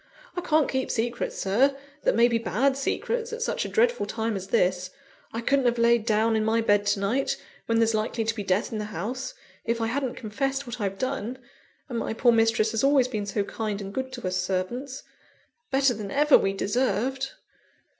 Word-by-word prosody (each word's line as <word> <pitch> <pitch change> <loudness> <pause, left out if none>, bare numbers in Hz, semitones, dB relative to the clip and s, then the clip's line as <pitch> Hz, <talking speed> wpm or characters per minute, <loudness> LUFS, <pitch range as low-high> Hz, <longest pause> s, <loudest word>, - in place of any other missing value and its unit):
I 355 - -2
can't 310 -4 +2
keep 260 -1 -1
secrets, 235 +1 -2
Sir, 260 +9 +2 0.3
that - - +3
may 235 +1 +6
be 235 -1 +1
bad 230 +7 +1
secrets, 460 - -2
at 460 +1 -3
such - - -1
a - - -4
dreadful 485 +1 +2
time 225 -1 -2
as 190 -1 -5
this; 185 -4 +1 0.4
I 230 - -3
couldn't 275 +2 +2
have 240 0 +2
laid 235 -1 +3
down 220 0 +3
in 220 - +1
my 220 +1 +2
bed 205 -2 +2
to 205 - +2
night, 230 +8 0 0.3
when 230 - +2
there's 225 0 +3
likely 220 +1 -1
to 225 +1 0
be 215 - -5
death 195 +1 0
in 220 - -3
the 210 - -3
house, 235 +7 -4 0.3
if 230 0 -1
I 225 - 0
hadn't 255 +2 -2
confessed 270 +5 -2
what 240 -1 -6
I've 195 -1 -2
done; 255 -1 -3 0.5
and 240 -5 -3
my - - -2
poor 240 +1 +4
mistress 225 -1 +3
has 225 +1 -1
always 275 -2 +4
been 215 -5 -3
so 200 0 0
kind 210 -1 -3
and 195 -1 -7
good 260 +2 -3
to 245 -7 -4
us 185 0 -1
servants 195 +9 -3 0.7
better 270 -1 +3
than 205 -3 -6
ever 295 +5 +5
we 195 - +3
deserved." 250 +5 -1
230 Hz, 205 wpm, -26 LUFS, 210-265 Hz, 0.7 s, may